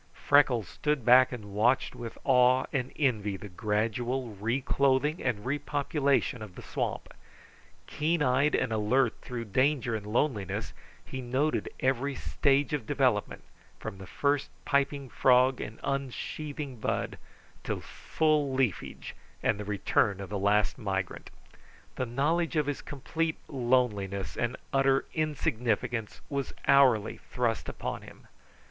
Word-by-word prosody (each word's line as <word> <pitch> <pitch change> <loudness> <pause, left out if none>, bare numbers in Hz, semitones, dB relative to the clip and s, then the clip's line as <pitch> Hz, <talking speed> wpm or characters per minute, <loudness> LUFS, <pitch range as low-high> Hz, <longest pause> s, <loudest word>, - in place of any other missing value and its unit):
Freckles 135 - +3
stood 150 0 -1
back 130 +1 +7
and 105 -5 -7
watched 120 +6 +2
with 115 -1 -8
awe 130 -1 +4
and 130 -2 -1
envy 105 -9 0
the 105 - -9
gradual 115 +6 -1
reclothing 130 - +1
and 120 -5 -1
repopulation 140 -2 0
of 105 -4 -9
the - - -9
swamp. - - -3 0.7
Keen 155 +1 0
eyed 140 +3 +3
and 115 - 0
alert 115 +3 +2
through 120 -2 -5
danger 130 +2 +1
and 105 -1 -5
loneliness, 105 - -1 0.3
he 130 - -6
noted 130 +5 0
every 135 +2 +1
stage 140 +3 +1
of 135 -7 -2
development, 130 -7 +1 0.3
from 95 - -7
the 95 - -9
first 145 +4 0 0.2
piping 140 -1 +1
frog 130 +1 +4
and 110 - -7
unsheathing 140 +1 -4
bud, - - -2 0.4
to - - -2
full 155 -3 0
leafage 130 -7 -2 0.3
and 105 - +1
the 105 - -5
return 100 -1 +1
of 100 - -6
the 100 - -2
last 105 +4 +2
migrant. 95 -4 -3 0.7
The 130 - -2
knowledge 160 +8 0
of 150 -2 +2
his 145 -1 -3
complete 160 +3 -3
loneliness 105 - 0
and 120 +1 -1 0.2
utter 135 0 +3
insignificance 120 -7 -1
was 140 -2 -3
hourly 130 -6 +5
thrust 120 -3 -1
upon - - -4
him. - - -14
130 Hz, 130 wpm, -29 LUFS, 110-140 Hz, 0.7 s, back